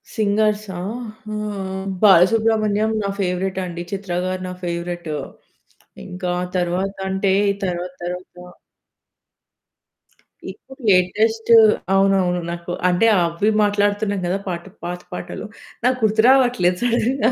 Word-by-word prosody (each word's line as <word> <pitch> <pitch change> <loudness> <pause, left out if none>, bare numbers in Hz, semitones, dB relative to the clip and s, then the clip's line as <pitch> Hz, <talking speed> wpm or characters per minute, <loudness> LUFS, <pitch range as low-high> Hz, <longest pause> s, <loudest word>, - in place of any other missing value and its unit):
సింగర్సా 210 -2 0 0.6
ఆహ్, 195 -2 -4 0.2
బాలసుబ్రమణ్యం 215 +2 +4
నా 200 - -1
ఫేవరేట్ 185 0 -1
అండి. 175 -1 -6
చిత్ర 195 -2 -4
గారు 185 0 -3
నా - - -5
ఫేవరేట్. 175 -1 -4 0.9
ఇంకా 180 0 -3 0.2
తరువాత 180 +3 -1
అంటే 190 0 +1 0.3
తరువాత 180 0 -3
తరువాత 180 +1 -5 2.2
ఇప్పుడు 265 0 -16
లేటెస్టూ 220 +5 +3 0.4
అవునువును. 195 -2 +2
నాకు 170 0 -6 0.2
అంటే 180 +6 +3 0.2
అవి 170 +5 0
మాట్లాడుతున్నాం 205 0 +1
కదా! 185 +2 0 0.5
పాత 180 0 -5
పాటలు. - - -6 0.4
నాకు 255 0 +3
గుర్తు 220 0 +3
రావట్లేదు 245 -9 +4
సడెన్‌గా. 245 +1 +1
195 Hz, 100 wpm, -20 LUFS, 180-215 Hz, 2.2 s, బాలసుబ్రమణ్యం